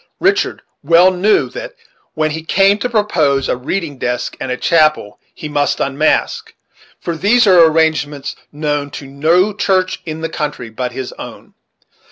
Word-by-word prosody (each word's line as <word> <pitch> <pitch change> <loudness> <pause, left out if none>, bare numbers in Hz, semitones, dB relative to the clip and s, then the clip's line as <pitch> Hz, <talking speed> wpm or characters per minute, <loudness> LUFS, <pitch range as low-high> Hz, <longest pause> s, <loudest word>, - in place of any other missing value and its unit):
Richard 395 +2 0 0.2
well 170 +5 +5
knew 185 +4 +2
that, - - -8 0.4
when 155 -1 0
he 160 +1 -4
came 195 +5 +2
to 250 - -2
propose 165 - +1
a - - 0
reading 145 +2 -4
desk 125 0 -3
and 130 - -4
a 125 - -2
chancel, 155 -11 +1
he 150 - -8
must 145 -1 0
unmask; 140 +3 0 0.4
for 170 - -4
these 215 +9 +3
were 175 -5 +6
arrangements 150 -3 0 0.2
known 145 -1 -2
to 140 - -9
no 165 +9 +1
church 190 -2 0
in 160 -2 -6
the 165 - -2
country 145 -7 -5
but 125 +2 -4
his 130 0 -6
own. - - -10
160 Hz, 160 wpm, -16 LUFS, 140-185 Hz, 0.4 s, were